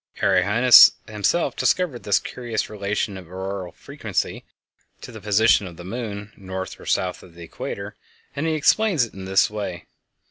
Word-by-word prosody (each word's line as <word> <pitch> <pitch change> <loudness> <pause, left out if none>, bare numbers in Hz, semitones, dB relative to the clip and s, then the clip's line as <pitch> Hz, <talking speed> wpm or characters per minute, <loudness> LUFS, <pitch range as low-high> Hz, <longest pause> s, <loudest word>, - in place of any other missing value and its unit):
Arrhenius 110 +7 +7
himself 110 - 0
discovered 170 -10 0
this 100 - +2
curious 120 -4 -4
relation 100 -1 -3
of 90 - -13
auroral 95 -1 -5
frequency - - -4 0.6
to - - -10
the 110 -2 -10
position 105 0 +3
of 85 -2 -11
the 85 - -9
moon 105 0 -6
north 95 -1 -7
or - - -13
south 90 -1 -1
of 85 -2 -17
the 85 - -11
equator, 80 - -7 0.4
and 150 +3 -2
he 160 - 0
explains 165 - +3
it 115 - -15
in 95 -1 -8
this 95 0 +3
way. 100 -5 -6
105 Hz, 165 wpm, -22 LUFS, 95-120 Hz, 0.6 s, Arrhenius